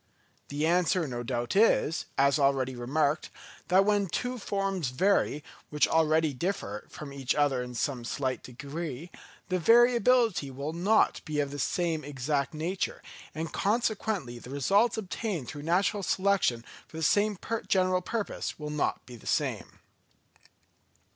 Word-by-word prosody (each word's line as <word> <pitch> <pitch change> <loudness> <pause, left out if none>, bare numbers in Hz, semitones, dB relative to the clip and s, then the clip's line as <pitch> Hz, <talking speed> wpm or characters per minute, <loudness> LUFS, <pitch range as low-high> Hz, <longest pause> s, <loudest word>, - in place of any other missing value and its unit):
The 145 +2 -1
answer 175 0 +2
no 120 -2 -4
doubt 120 +2 -3
is, 195 -6 +3
as 140 +2 +4
already 135 -2 +2
remarked, 145 +5 0 0.4
that 190 +2 +4
when 205 -1 +2
two 250 +8 -3
forms 195 - -1
vary, 150 +1 +1 0.3
which 150 0 +2
already 160 -1 +2
differ 125 - -3
from 145 -2 -9
each 135 -2 -1
other 145 -4 +2
in 125 0 -7
some 125 0 -2
slight 130 +2 -2
degree, 145 +4 -6 0.4
the 185 0 +1
variability 235 - +4
will 140 +4 -5
not 200 +6 +2
be 150 -1 -3
of 140 -1 0
the 145 - -6
same 165 +1 0
exact 140 0 -2
nature, 175 +5 -3 0.3
and 160 +1 -4
consequently 205 - -1
the 125 - -12
results 200 - +2
obtained 195 - -3
through 145 - -7
natural 185 +6 +1
selection 185 -12 +1 0.2
for 160 - -11
the 160 - -3
same 205 +5 +3 0.3
general 185 -1 +2
purpose 215 +3 -3
will 150 -1 -5
not 150 -1 -1
be 125 - -10
the 115 - -13
same. - - -2
155 Hz, 145 wpm, -29 LUFS, 140-195 Hz, 0.4 s, as